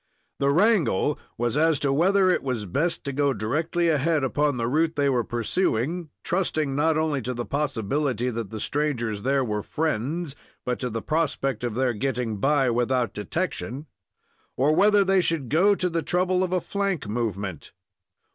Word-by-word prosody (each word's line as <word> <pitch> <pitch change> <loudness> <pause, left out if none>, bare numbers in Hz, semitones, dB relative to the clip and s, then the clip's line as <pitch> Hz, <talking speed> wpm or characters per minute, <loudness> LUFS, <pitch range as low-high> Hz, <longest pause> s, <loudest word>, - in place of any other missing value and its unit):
The 140 - +2
wrangle 165 - +2 0.2
was 120 +1 -1
as 155 -1 +3
to 140 -1 +1
whether 185 +5 +4
it - - +1
was 125 -6 -3
best 150 - -1
to 140 - -4
go 140 0 +2
directly 155 - -1
ahead 155 -1 +2
upon 145 +1 +1
the 115 - -1
route 155 +5 +1
they 140 -2 +2
were 125 -3 +1
pursuing, 145 - -1
trusting 155 -6 -1
not 155 +2 +2
only 155 -3 0
to 125 +1 -4
the 120 0 -3
possibility 130 -2 -1
that 115 -3 -4
the 110 - -6
strangers 120 -7 -1
there 135 +2 +1
were 105 -2 -2
friends, 150 - -2 0.3
but 125 0 -1
to 125 - -2
the 115 -1 -4
prospect 140 -6 -1
of 120 -3 -2
their 130 -1 +1
getting 120 -1 -2
by 135 +3 +2
without 120 -1 0
detection, 145 - -3 0.7
or 140 +4 +3
whether 205 +2 +5
they 190 -1 +3
should 160 -8 -1
go 190 +7 +4
to 180 - -1
the 170 -1 -1
trouble 180 +2 +1
of 185 - -2
a 185 -1 +1
flank 200 - -2
movement. 105 -6 -3
140 Hz, 175 wpm, -25 LUFS, 120-165 Hz, 0.7 s, whether